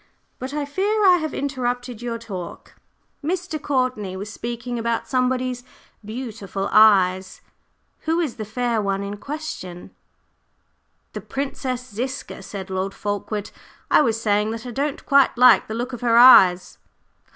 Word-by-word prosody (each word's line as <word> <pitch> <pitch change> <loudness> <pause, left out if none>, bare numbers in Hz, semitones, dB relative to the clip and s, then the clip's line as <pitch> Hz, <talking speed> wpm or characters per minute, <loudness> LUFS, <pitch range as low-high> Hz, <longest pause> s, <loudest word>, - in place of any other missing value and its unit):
But 260 +1 -5
I 295 0 -2
fear 405 +8 0
I 365 -2 +7
have 315 -3 -3
interrupted 245 -3 -3
your 235 -1 -3
talk. 195 -7 -8 0.5
Mr. 350 0 -3
Courtney 255 -9 -1
was 205 +2 -7
speaking 240 +1 -5
about 230 0 -2
somebody's 255 -1 -1 0.4
beautiful 215 -4 -5
eyes; 190 -3 +4 0.6
who 325 +2 +1
is 305 -9 -2
the 220 - -4
fair 230 +1 -1
one 195 -1 -1
in 200 +1 -5
question?" 270 - -7 1.2
"The - - -5
Princess 260 -2 -4
Ziska," 255 +1 -5
said 195 -1 -8
Lord 190 +1 -3
Fulkeward. 205 0 -4 0.4
"I - - +6
was 230 -5 +1
saying 210 -1 +1
that 225 +2 -6
I 245 - -5
don't 280 +4 -3
quite 275 -3 +4
like 250 +1 +6
the 220 - -5
look 245 +3 -4
of 245 - -6
her 235 -1 +3
eyes." 190 -8 +7
240 Hz, 145 wpm, -22 LUFS, 205-265 Hz, 1.2 s, I